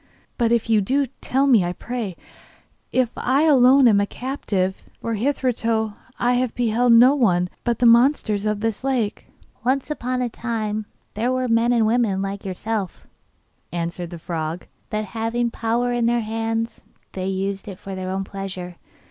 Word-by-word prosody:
'But 235 -2 +1
if 235 -1 +2
you 220 -2 +4
do, 275 +8 +1
tell 265 +1 -1
me, 240 -9 +5
I 175 0 -2
pray, 225 -4 -5 0.7
if 255 -2 +1
I 270 +4 +2
alone 270 -3 +6
am 205 -3 +5
a 200 - 0
captive, 200 -8 -2 0.2
for 230 - -3
hitherto 225 -3 0 0.2
I 245 0 +2
have 250 -1 0
beheld 240 0 +3
no 245 +4 +7
one 180 -10 +2
but 235 -2 0
the 245 - +1
monsters 235 -4 +4
of 210 -1 -1
the 225 -1 0
lake.' 250 -6 -1 0.4
'Once 265 +4 0
upon 255 -3 -2
a - - 0
time 215 -3 -3 0.3
they 230 +4 -1
were 255 0 0
men 230 +1 +3
and 230 -2 +3
women 220 -4 +2
like 195 +1 -4
yourself,' 200 0 -4 0.7
answered 170 0 -4
the 170 - -7
frog, 165 0 -4 0.2
'but 215 0 -2
having 230 +2 -2
power 235 +2 0
in 240 -1 +1
their 240 0 +2
hands, 225 +1 -3 0.3
they 185 0 -4
used 195 +1 -3
it 195 -3 -7
for 195 - -8
their 185 0 -4
own 190 +1 -2
pleasure. 185 -3 -7
225 Hz, 170 wpm, -22 LUFS, 195-245 Hz, 0.7 s, no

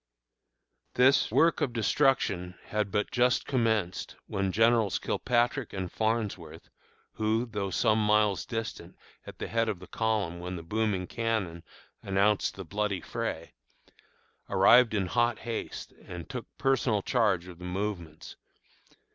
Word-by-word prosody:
This 130 +3 +5
work 165 0 +3
of 125 - 0
destruction 110 -7 +1
had 105 -1 -1
but 105 0 -1
just 125 0 +2
commenced 110 -8 0
when 95 -1 -1
Generals 115 0 +3
Kilpatrick 125 +1 0
and 95 -3 -4
Farnsworth, 105 -8 -2 0.4
who, 110 +2 0
though 105 -4 -3
some 110 +3 +2
miles 105 -2 +3
distant 115 -2 -5 0.3
at - - -9
the - - -4
head 115 -1 0
of 105 - -2
the 90 - -12
column 105 -6 -1
when 90 +1 -5
the 85 - -7
booming 105 0 -1
cannon 105 -6 -2 0.4
announced 100 +1 +1
the 95 - -7
bloody 100 +2 -1
fray, 115 -8 -4 1.0
arrived 120 -3 +6
in 100 -2 +1
hot 120 +4 +1
haste 115 +1 -5 0.2
and 90 -2 -7
took 125 -3 -6
personal 130 -6 +1
charge 105 -8 +1
of 90 -2 -11
the 90 - -8
movements. 90 -4 -5
105 Hz, 135 wpm, -29 LUFS, 95-115 Hz, 1.0 s, arrived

